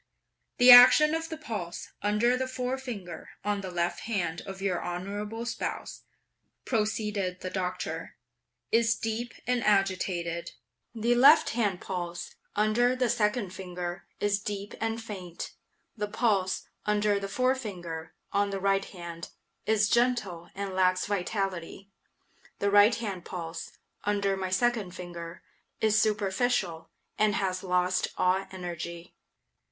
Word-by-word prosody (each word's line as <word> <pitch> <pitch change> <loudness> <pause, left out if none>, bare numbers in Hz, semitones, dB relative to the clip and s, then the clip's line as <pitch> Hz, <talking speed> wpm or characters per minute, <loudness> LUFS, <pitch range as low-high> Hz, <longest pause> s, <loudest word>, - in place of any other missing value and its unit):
"The 250 +1 +9
action 255 +5 +10
of 325 0 -2
the 320 - -5
pulse, 215 - -5
under 210 +4 +2
the 260 +1 -1
forefinger, 250 -9 -5 0.2
on 205 -1 0
the 190 - -5
left 175 -1 -1
hand 180 -7 -2
of 195 0 -7
your 190 -2 -1
honorable 205 +6 -4
spouse," 235 - -4 0.6
proceeded 210 -5 -1
the 185 - -4
Doctor, 185 -1 -3 0.6
"is 230 0 +4
deep 230 +1 -3
and 250 -2 +1
agitated; 185 -4 0 0.4
the 230 +2 +2
left 270 +6 +7
hand 210 -6 0
pulse, 175 -2 -5 0.2
under 225 +4 +3
the 250 -2 +1
second 210 -2 0
finger, 180 -1 -6
is 205 0 +1
deep 205 0 -5
and 225 0 -1
faint. 185 -6 -7 0.4
The 210 -2 -2
pulse, 205 -4 0 0.2
under 210 -1 +2
the 195 0 -5
forefinger, 200 -11 -2 0.2
of 200 0 +2
the 195 -1 -3
right 195 0 +2
hand, 170 -2 -8 0.4
is 215 -1 +4
gentle 220 -8 +1
and 200 -1 -4
lacks 185 0 +2
vitality. 195 -1 -3 0.7
The 200 0 0
right 205 +3 +7
hand 200 -6 -4
pulse, 170 -2 -6 0.3
under 200 -1 +1
my 190 -1 -3
second 205 -2 +1
finger, 175 -1 -8 0.4
is 215 0 +3
superficial, 200 -5 0 0.3
and 215 -1 +3
has 185 -2 -1
lost 180 0 +1
all 185 +1 +2
energy. 170 -1 -6
200 Hz, 130 wpm, -29 LUFS, 180-225 Hz, 0.7 s, action